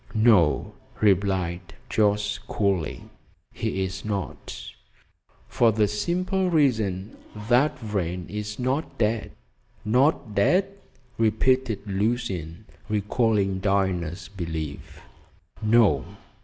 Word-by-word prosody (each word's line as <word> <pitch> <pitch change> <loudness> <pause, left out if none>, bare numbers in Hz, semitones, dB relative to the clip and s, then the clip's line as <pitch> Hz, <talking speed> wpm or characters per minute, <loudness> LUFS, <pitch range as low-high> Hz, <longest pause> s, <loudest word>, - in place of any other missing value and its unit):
"No," 95 - +4 0.3
replied 90 -4 +1
Jorce 105 -1 +1
coolly, 95 -7 -1 0.5
"he's 95 +1 -3
not, 100 -3 -4 0.9
for 115 -2 +3
the 105 -1 +2
simple 180 - 0
reason 110 - +1 0.3
that 140 +5 +4
Vrain 90 - -3
is 105 0 -5
not 130 +5 -2
dead." 110 0 0 0.5
"Not 125 0 +2
dead?" 185 - +2 0.5
repeated 115 +1 +2
Lucian, 100 -4 -2 0.2
recalling 105 -2 +1
Diana's 95 -3 0
belief. 80 -6 -6 0.6
"No! 110 0 +4
105 Hz, 85 wpm, -25 LUFS, 95-115 Hz, 0.9 s, No